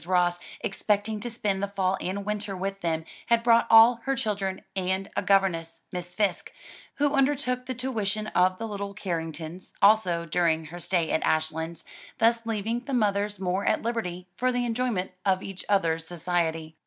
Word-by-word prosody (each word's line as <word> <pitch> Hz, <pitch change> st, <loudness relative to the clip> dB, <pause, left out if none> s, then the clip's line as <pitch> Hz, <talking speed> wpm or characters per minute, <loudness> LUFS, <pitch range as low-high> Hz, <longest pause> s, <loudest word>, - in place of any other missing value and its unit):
Ross, 175 Hz, -1 st, +2 dB, 0.2 s
expecting 210 Hz, +1 st, 0 dB
to 240 Hz, +3 st, -4 dB
spend 205 Hz, -4 st, -1 dB
the 200 Hz, -, 0 dB
fall 190 Hz, -1 st, 0 dB
and 195 Hz, +2 st, -3 dB
winter 205 Hz, -2 st, -3 dB
with 195 Hz, +1 st, -4 dB
them, 160 Hz, -1 st, -1 dB, 0.2 s
had 235 Hz, 0 st, +3 dB
brought 230 Hz, 0 st, +5 dB
all 225 Hz, +1 st, +8 dB
her 270 Hz, 0 st, +1 dB
children 200 Hz, -7 st, -2 dB
and 190 Hz, +1 st, -1 dB
a -, -, +1 dB
governess, 165 Hz, -4 st, +1 dB
Miss 180 Hz, 0 st, -6 dB
Fisk, 205 Hz, -4 st, 0 dB, 0.4 s
who 290 Hz, 0 st, +1 dB
undertook 265 Hz, -2 st, +1 dB
the 255 Hz, -, -3 dB
tuition 215 Hz, -4 st, -2 dB
of 185 Hz, +1 st, +3 dB
the 225 Hz, -, -4 dB
little 200 Hz, -1 st, -5 dB
Carringtons 165 Hz, -1 st, -5 dB
also 190 Hz, -5 st, +4 dB
during 165 Hz, -1 st, +1 dB
her 170 Hz, +3 st, -8 dB
stay 175 Hz, -2 st, 0 dB
at 160 Hz, -, +1 dB
Ashlands, 160 Hz, +1 st, -1 dB, 0.3 s
thus 230 Hz, 0 st, +2 dB
leaving 225 Hz, +1 st, -1 dB
the 260 Hz, +2 st, -4 dB
mothers 205 Hz, -2 st, +1 dB
more 190 Hz, +1 st, -1 dB
at -, -, +1 dB
liberty 185 Hz, -6 st, -3 dB
for 255 Hz, +5 st, +1 dB
the 245 Hz, 0 st, 0 dB
enjoyment 230 Hz, -5 st, -1 dB
of 190 Hz, -1 st, +1 dB
each 195 Hz, -1 st, -7 dB
other's 165 Hz, -5 st, +1 dB
society. 165 Hz, -2 st, -2 dB
195 Hz, 170 wpm, -27 LUFS, 175-225 Hz, 0.4 s, all